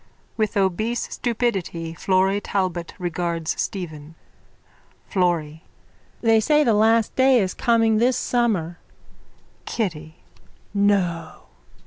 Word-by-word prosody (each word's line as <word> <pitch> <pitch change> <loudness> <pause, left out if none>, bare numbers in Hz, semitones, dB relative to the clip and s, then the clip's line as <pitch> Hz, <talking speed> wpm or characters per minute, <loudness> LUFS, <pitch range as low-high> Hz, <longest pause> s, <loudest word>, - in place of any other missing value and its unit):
(With 215 -1 -1
obese 200 +5 -1
stupidity 195 -9 -2
Florry 190 +3 +1
Talbot 185 -4 -2
regards 170 -2 -2
Stephen.) 160 -5 -6 0.9
FLORRY: 165 -4 -1 0.6
They 225 -1 +4
say 300 +7 +3
the 235 -5 +3
last 220 +1 +3
day 260 0 +5
is 190 -3 -1
coming 225 -2 +2
this 245 +3 +2
summer. 210 -10 0 0.9
KITTY: 160 -8 -4 0.6
No! 185 -5 0
195 Hz, 95 wpm, -22 LUFS, 170-225 Hz, 0.9 s, day